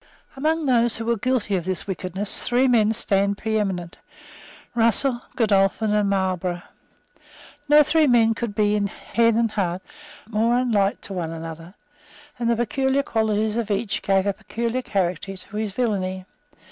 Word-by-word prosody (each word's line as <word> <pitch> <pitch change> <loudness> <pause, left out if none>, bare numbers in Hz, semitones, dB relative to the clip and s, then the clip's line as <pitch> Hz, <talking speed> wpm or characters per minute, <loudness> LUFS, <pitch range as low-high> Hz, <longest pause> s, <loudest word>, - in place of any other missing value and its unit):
Among 310 +3 0
those 240 -3 +2
who 225 - -5
were 235 0 +2
guilty 230 -3 0
of 180 - -1
this 185 +1 -3
wickedness 190 +1 -4
three 250 +2 +3
men 220 -4 +4
stand 200 -2 +1
preeminent, 195 -6 -2 0.8
Russell, 240 +2 +2
Godolphin 210 -1 +2
and 210 -1 +2
Marlborough. 185 -2 -1 1.1
No 300 0 +8
three 315 +1 +3
men 230 -3 +4
could 225 -2 -4
be, 210 0 +2
in 205 -1 +1
head 230 +3 +1
and 230 -1 +1
heart, 185 -3 -2 0.4
more 230 +2 +1
unlike 210 -6 +1
to 195 - -7
one 175 -3 -3
another; 165 +2 -8 0.6
and 235 -1 0
the 235 - +3
peculiar 265 +4 0
qualities 220 -3 0
of 230 -3 -2
each 200 +1 -1
gave 195 -1 +2
a 200 - +1
peculiar 235 +5 -3
character 190 -3 -2
to 195 - -7
his 215 -1 -2
villany. 190 -5 -2
215 Hz, 155 wpm, -23 LUFS, 195-235 Hz, 1.1 s, No